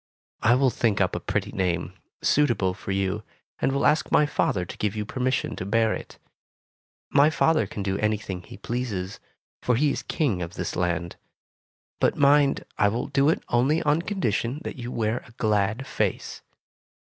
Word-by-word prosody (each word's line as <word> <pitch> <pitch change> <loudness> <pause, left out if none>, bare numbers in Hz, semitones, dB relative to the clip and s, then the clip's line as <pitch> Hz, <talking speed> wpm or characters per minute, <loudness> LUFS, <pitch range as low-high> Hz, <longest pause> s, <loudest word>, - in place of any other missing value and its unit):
I 115 +2 +5
will 130 0 +3
think 110 -4 +1
up 90 -3 +1
a - - -1
pretty - - -2
name, 90 -2 -1 0.3
suitable 120 -11 +2
for 100 - -10
you, 95 -1 -1 0.4
and - - +1
will 140 +1 0
ask 150 +1 +2
my 150 - +5
father 100 -10 0
to - - -9
give 105 0 -1
you 105 -1 -2
permission 130 +2 -1
to - - -4
bear 110 +3 +2
it. - - -8 0.9
My 145 +1 +6
father 155 -6 +2
can 100 0 -5
do 95 0 -1
anything 105 -4 -1
he 90 - -12
pleases, 105 -5 -4 0.4
for 125 - +2
he 145 +4 +2
is - - -3
King 120 - -1
of 85 0 -5
this - - -3
land. 85 -1 -1 0.8
But, - - +2
mind, 140 0 +4
I 105 - +5
will 115 +4 -2
do 140 +2 +3
it 160 - 0
only 135 +8 +2
on 150 +2 +2
condition 140 - -1
that - - -6
you 120 0 -6
wear 110 0 0
a - - -17
glad 110 +3 0
face. - - -2
115 Hz, 180 wpm, -25 LUFS, 95-140 Hz, 0.9 s, My